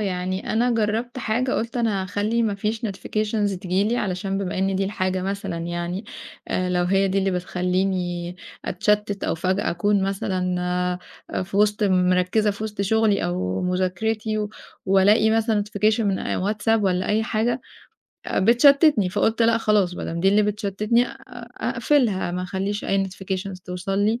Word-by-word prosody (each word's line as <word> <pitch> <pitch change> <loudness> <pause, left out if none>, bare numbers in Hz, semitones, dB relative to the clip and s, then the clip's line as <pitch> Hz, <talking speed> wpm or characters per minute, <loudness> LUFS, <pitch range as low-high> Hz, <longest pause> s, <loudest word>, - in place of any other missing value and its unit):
يعني 185 -1 -2
أنا 240 +3 +2
جرّبت 225 +3 -1
حاجة، 245 +3 0
قُلت 230 +2 -2
أنا 220 -5 0
هاخلّي 210 +5 0
ما 210 -3 0
فيش 215 +2 -2
notifications 210 0 -2
تيجي 185 +2 0
لي 230 +3 0
علشان 195 -2 -2
بما 185 -2 -3
إن 190 0 +1
دي 195 - +1
الحاجة 185 -2 -1
مثلًا 195 -2 -3
يعني، 175 +4 -4 0.4
آآ، 185 0 0
لو 180 0 +1
هي 195 +2 +2
دي 195 +1 +1
اللي 195 0 +1
بتخلّيني 180 -1 -1 0.3
أتشَتِّت 205 +1 0
أو - - 0
فجأة 185 +4 0
أكون 200 +3 +1
مثلًا 180 -2 -1 0.5
في 195 +2 -6
وِسْط 210 +1 +2
مركِّزة 185 +2 +2
في 205 +2 -5
وسط 210 -2 -5
شغلي 215 0 +2
أو 90 +1 -2
مذاكرتي، 210 +4 -1 0.4
وألاقي 200 +3 +4
مثلًا 220 -2 +2
notification 215 +2 +1
من 200 -3 +1
آآ، - - -2
واتساب 215 +3 +1
والَّا 185 -1 0
أي 215 +1 +2
حاجة، 235 +2 0 0.7
آآ، - - -1
بتشتِّتني، 250 - +5
فقُلت 220 +4 +1
لأ 230 0 +4
خلاص، 205 -5 +2
بدام 170 -1 -4
دي 195 - +4
اللي 210 +2 +4
بتشتِّتني 210 +2 +1
أ - - -8
أ - - -8
أقفِلها، 230 - +1
ما 180 +1 -3
أخلّيش 195 +3 -3
أي 195 0 +1
notifications 190 0 -5
توصل 185 +2 -3
لي، 220 +4 +1
195 Hz, 160 wpm, -23 LUFS, 185-215 Hz, 0.7 s, بتشتِّتني